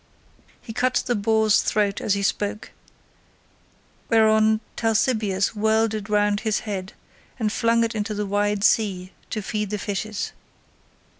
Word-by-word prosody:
He 225 - -8
cut 250 +1 +1
the 245 - +1
boar's 220 0 +3
throat 205 -2 0
as 200 - +1
he 200 - -2
spoke, 205 +1 -2 1.4
whereon 220 -1 +4 0.2
Talthybius 220 -3 +1
whirled 220 +1 +2
it 215 -1 -5
round 205 -1 +2
his 220 -1 -1
head, 195 -3 -5 0.4
and 220 -4 -1
flung 230 0 +2
it 230 - -1
into 215 0 -3
the 210 0 -2
wide 205 0 0
sea 190 -4 +1 0.2
to 215 - -3
feed 210 -1 -3
the 210 - -2
fishes. 205 +1 -4
215 Hz, 140 wpm, -23 LUFS, 205-220 Hz, 1.4 s, whereon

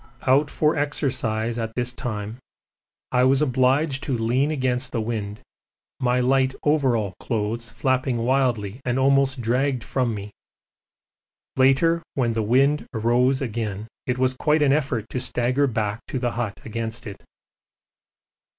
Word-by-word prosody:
Out 140 +3 +4
for 155 0 +1
exercise 125 -6 -1
at 110 0 -4
this 125 0 -2
time 110 -2 -5 0.7
I 125 0 +3
was 130 +1 +4
obliged 135 +1 +2
to 135 -4 -1
lean 120 +6 +1
against 130 -3 -1
the 120 - -1
wind, 110 -2 -4 0.6
my 125 0 +2
light 130 +1 +2
overall 130 -10 +1
clothes 115 0 -2
flapping 130 +1 0
wildly 120 -3 0
and 125 0 -1
almost 135 -1 +2
dragged 125 +2 0
from 125 -2 -1
me; 100 0 -7 1.2
later 135 +6 +3
when 120 -4 +1
the 110 - 0
wind 135 +7 +2
rose 125 +3 +2
again 110 -3 -4 0.2
it 125 -1 0
was 130 0 +2
quite 150 +3 +2
an 135 -1 +4
effort 130 -7 -1
to 130 - -2
stagger 125 +2 +1
back 110 -3 -2
to - - -3
the 120 -1 -1
hut 115 -4 -3
against 115 0 -4
it. 100 -3 -9
125 Hz, 140 wpm, -23 LUFS, 115-135 Hz, 1.2 s, Out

